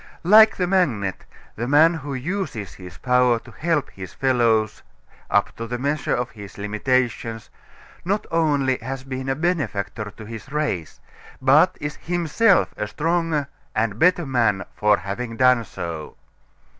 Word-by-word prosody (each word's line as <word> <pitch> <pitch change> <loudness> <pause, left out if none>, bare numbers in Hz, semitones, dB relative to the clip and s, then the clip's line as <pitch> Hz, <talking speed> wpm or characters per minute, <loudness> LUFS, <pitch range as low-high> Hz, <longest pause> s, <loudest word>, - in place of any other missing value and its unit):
Like 215 +4 +7
the 180 - 0
magnet, 135 - 0 0.3
the 120 +2 -3
man 155 +5 +5
who 145 -4 -5
uses 135 - -4
his 90 -1 -11
power 125 -1 +3
to - - -13
help 160 -3 -1
his 95 -2 -10
fellows 115 -5 +1 0.5
up - - +1
to 115 - -5
the 125 +1 -3
measure 145 +3 -1
of 120 0 -3
his 100 -3 -11
limitations 115 +2 -1 0.5
not 200 +4 -1
only 145 -6 +1
has 130 +3 -6
been 130 0 -5
a 135 - +1
benefactor 135 - -2
to 110 +1 -12
his 115 +3 -9
race, 145 - -2 0.4
but 145 +7 +4
is 145 0 -5
himself 175 +5 +2
a 105 - -2
stronger 160 +3 -1 0.3
and 110 -1 -1
better 180 -1 +3
man 115 -7 +1
for 105 -1 +3
having 115 +4 -5
done 125 -2 +4
so. 85 -7 -7
130 Hz, 145 wpm, -22 LUFS, 110-155 Hz, 0.5 s, Like